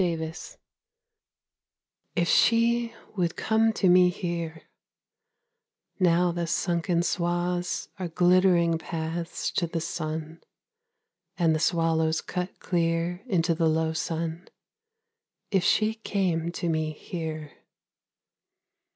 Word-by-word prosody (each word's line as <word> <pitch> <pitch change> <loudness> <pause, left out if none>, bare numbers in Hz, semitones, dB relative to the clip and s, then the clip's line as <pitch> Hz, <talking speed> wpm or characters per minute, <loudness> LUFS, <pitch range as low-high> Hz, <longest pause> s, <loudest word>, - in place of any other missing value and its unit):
DOG 170 -3 +1
TIRED 160 0 -5 1.8
If 170 0 +1
she 235 +2 +3 0.2
would 175 -3 0
come 225 0 +2
to 200 - +1
me 180 0 +6
here, 170 -3 -4 1.4
Now 175 -1 +3
the 170 0 -3
sunken 170 0 0
swaths 175 0 -1
Are 185 - -2
glittering 175 -1 +3
paths 165 0 -4
To 170 - 0
the 165 0 -3
sun, 160 0 -5 1.0
and 165 -3 +3
the 155 - 0
swallows 160 -1 +1
cut 180 +1 -4
clear 170 0 0
Into 170 -6 +2
the 165 0 +2
low 160 0 +1
sun 165 +2 -3 1.0
if 190 -3 +2
she 215 0 +3
came 185 -6 -1
to 175 - -3
me 155 -1 0
here! 155 -2 -6
170 Hz, 110 wpm, -27 LUFS, 160-180 Hz, 1.8 s, me